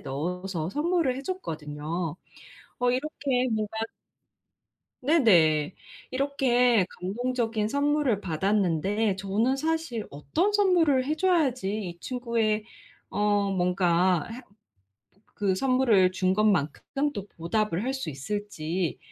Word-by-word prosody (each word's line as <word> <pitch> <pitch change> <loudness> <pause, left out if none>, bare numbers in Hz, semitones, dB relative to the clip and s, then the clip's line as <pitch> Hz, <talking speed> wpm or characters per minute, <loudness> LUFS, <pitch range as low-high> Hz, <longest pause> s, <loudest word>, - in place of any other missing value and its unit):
넣어서 170 +4 -3
선물을 320 - +1
해 270 - -6
줬거든요. 160 - -4 0.6
어 245 0 +2
이렇게 260 -2 -1
뭐가 215 0 -2 1.3
네네. 180 - +4 0.3
이렇게 250 -5 +2
감동적인 225 +2 -1
선물을 285 -4 +1
받았는데 195 +3 0
저는 210 +7 +1
사실 310 -6 -2
어떤 315 - -1
선물을 345 -10 +3
해 305 +3 0
줘야지 310 - +1 0.2
이 170 - -17
친구의 230 -2 -1 0.5
어 205 0 +1
뭔가 180 -2 +2
해 245 - -8 1.0
그 200 -2 +2
선물을 225 -5 +3
준 185 0 +1
것만큼 210 - 0
또 200 -1 -6
보답을 195 +2 -1
할 260 +2 -1
수 265 -12 -4
있을지 170 +2 -3
215 Hz, 225 characters per minute, -27 LUFS, 180-265 Hz, 1.3 s, 네네